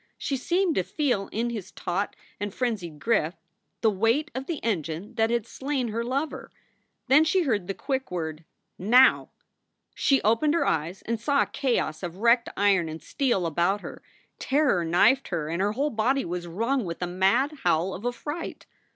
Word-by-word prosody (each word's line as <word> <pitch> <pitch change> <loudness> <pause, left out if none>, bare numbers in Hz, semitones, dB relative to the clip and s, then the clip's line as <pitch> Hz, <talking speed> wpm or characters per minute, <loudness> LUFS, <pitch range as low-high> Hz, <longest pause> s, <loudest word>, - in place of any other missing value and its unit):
She 275 - -2
seemed 345 +6 +1
to 185 - +1
feel 245 - -1
in 235 +2 -2
his 215 -6 -6
taut 190 +4 -3 0.2
and 205 0 -3
frenzied 195 -10 -3
grip 180 -4 +1 0.5
the 220 - +4
weight 230 - +1
of 265 +1 -5
the 335 - -2
engine 185 - -2
that 225 -1 +1
had 235 -2 0
slain 265 -1 -3
her 230 +2 -2
lover. 275 +6 -3 0.6
Then 285 +4 +6
she 360 +3 +2
heard 210 - 0
the 195 - -3
quick 265 -1 -3
word, 160 -3 -4 0.4
Now! 245 +7 +5 0.6
She 275 -1 +3
opened 230 +9 +3
her 335 - +2
eyes 165 +4 -1
and 230 0 -2
saw 280 +4 +2
a - - -11
chaos 235 - 0
of 175 -1 -6
wrecked 235 +3 +3
iron 195 -5 +3
and 160 +1 -6
steel 245 -10 0
about 175 +5 +1
her. - - -9 0.4
Terror 270 - +2
knifed 205 +11 +3
her 165 -4 -2
and 170 +3 -1
her 205 +1 +1
whole 285 +5 0
body 255 +5 +1
was 175 0 -4
wrung 230 +9 0
with 170 -3 -5
a - - +1
mad 225 - +1
howl 175 +4 +2
of 200 - -7
affright. 295 +7 -5
225 Hz, 180 wpm, -26 LUFS, 180-265 Hz, 0.6 s, Then